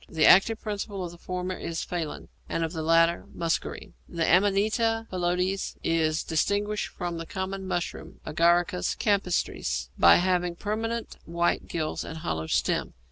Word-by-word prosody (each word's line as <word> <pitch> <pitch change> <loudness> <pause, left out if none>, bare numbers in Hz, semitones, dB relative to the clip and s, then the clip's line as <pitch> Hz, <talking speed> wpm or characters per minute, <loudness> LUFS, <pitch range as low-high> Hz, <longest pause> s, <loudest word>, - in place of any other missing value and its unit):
The 160 -1 +2
active 215 +4 +6
principle 205 -3 -4
of 170 - -6
the 170 - -14
former 185 +1 -3
is 165 -1 -4
phallin, 170 -4 -4 0.2
and 165 - -1
of 165 +1 -3
the 160 - -3
latter 165 +1 +3
muscarine. 165 -1 -2 0.2
The 165 -1 -1
Amanita 215 +5 +2
phalloides 180 +1 -1
is 160 -1 +1
distinguished 205 +6 0
from 175 -2 -5
the 165 - -6
common 190 0 -4
mushroom 175 -2 -4
(Agaricus 175 +3 +2
campestris) 200 -4 0
by - - +8
having 180 -1 +1
permanent 225 +4 -3
white 170 +1 0
gills 155 -2 -3
and 160 - -7
a - - -8
hollow 80 - -3
stem. - - 0
180 Hz, 150 wpm, -27 LUFS, 165-195 Hz, 0.2 s, by